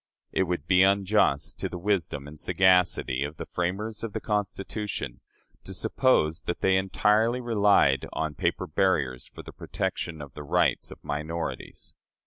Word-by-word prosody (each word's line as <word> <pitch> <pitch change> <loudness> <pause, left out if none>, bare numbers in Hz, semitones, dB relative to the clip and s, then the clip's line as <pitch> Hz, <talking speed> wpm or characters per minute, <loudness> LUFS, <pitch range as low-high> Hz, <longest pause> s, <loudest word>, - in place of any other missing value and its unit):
It 95 - +1
would 85 -4 -2
be 90 +1 +4
unjust 95 -8 +2
to - - -2
the 90 - -6
wisdom 85 -7 -1
and 75 +1 -11
sagacity 90 -7 +2
of 75 +2 -5
the - - -5
framers 100 +6 -3
of 115 -3 -4
the - - -2
Constitution 105 - -3 0.4
to - - -7
suppose 80 -11 +2
that 85 - -2
they 95 0 +3
entirely 105 +5 +2
relied 100 - +3
on 80 -1 -2
paper - - -1
barriers 75 -8 0
for - - -11
the - - -11
protection 80 -2 -4
of 70 -3 -9
the 75 - -8
rights 75 - +1
of - - -13
minorities. 80 +3 -5
90 Hz, 155 wpm, -27 LUFS, 75-100 Hz, 0.4 s, be